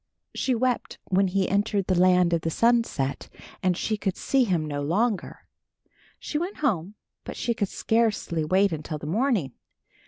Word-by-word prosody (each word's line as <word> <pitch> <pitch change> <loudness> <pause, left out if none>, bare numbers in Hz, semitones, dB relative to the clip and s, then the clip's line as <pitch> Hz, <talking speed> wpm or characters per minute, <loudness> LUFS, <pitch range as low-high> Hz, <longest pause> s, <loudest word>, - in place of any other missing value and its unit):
She 255 - 0
wept 250 +1 -1
when 190 +1 +3
he 190 0 0
entered 200 -1 0
the 185 - +1
land 180 -1 +4
of 165 - +1
the 165 - -1
sunset 230 - +1 0.3
and 180 -2 +1
she 215 - -1
could 195 -3 -2
see 270 -2 +2
him 175 -7 0
no 145 -1 -3
longer. 200 +8 -1 0.7
She 300 - -3
went 360 +5 -4
home, 195 - 0 0.3
but - - -7
she 235 - 0
could 205 -3 -2
scarcely 220 -8 0
wait 190 +5 +3
until 155 0 -4
the 150 - -9
morning. 205 - 0
195 Hz, 165 wpm, -26 LUFS, 170-230 Hz, 0.7 s, land